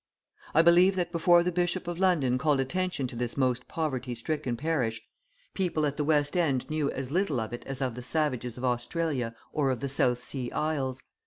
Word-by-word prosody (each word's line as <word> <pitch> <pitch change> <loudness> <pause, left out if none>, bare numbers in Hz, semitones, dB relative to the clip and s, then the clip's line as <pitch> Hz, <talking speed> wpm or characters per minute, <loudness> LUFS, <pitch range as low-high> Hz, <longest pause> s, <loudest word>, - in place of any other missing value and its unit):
I 165 - +7
believe 175 +3 +6
that 175 -2 -1
before 175 0 +5
the 180 - 0
Bishop 175 +1 -1
of 175 0 -4
London 150 -10 +2
called 145 -1 +2
attention 175 +2 -1
to 125 - -6
this 120 +1 -3
most 130 -2 +1
poverty 130 -6 -2
stricken 125 0 -2
parish, 130 -7 -1 0.5
people 175 -5 0
at 145 -1 -1
the 150 - -1
West 145 0 +2
End 145 -8 +1
knew 155 -2 0
as 135 0 -4
little 170 -6 +1
of 110 +1 -4
it 120 - -6
as 135 0 -4
of 130 -2 -1
the 125 - -7
savages 125 -3 -1
of 125 - -3
Australia 125 0 -1 0.2
or 135 -4 +1
the 125 +3 -4
South 125 -2 +1
Sea 125 -3 -4
Isles. 135 -4 -1
140 Hz, 195 wpm, -28 LUFS, 125-165 Hz, 0.5 s, I